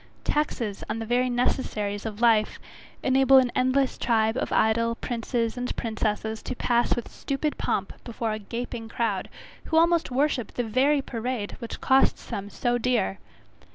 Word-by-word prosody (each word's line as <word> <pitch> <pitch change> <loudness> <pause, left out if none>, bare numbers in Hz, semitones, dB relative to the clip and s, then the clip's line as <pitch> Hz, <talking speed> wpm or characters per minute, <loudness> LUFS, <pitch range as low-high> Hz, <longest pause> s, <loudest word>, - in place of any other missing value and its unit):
Taxes 240 -9 -1
on 215 - -2
the 225 - -4
very 250 +2 +1
necessaries 220 -4 -1
of 215 0 -7
life, 225 -3 +3 0.5
enable 265 0 +5
an 255 -2 +4
endless 260 +1 +1
tribe 220 -1 +2
of - - -2
idle 230 +1 +2
princes 230 0 -2
and 250 0 -3
princesses 220 -1 -2
to 255 - -5
pass 240 0 +2
with 240 - -5
stupid 290 +2 -2
pomp - - -1
before 230 -1 -3
a 215 - -3
gaping 230 +1 -5
crowd, 225 -5 -1 0.4
who 320 - 0
almost 335 0 +4
worship 265 -1 0
the 245 - 0
very 270 +5 +2
parade 235 -3 -3
which 235 -3 -6
costs 265 0 +3
them 200 0 -5
so 240 +3 0
dear. 235 - 0
240 Hz, 155 wpm, -26 LUFS, 220-255 Hz, 0.5 s, enable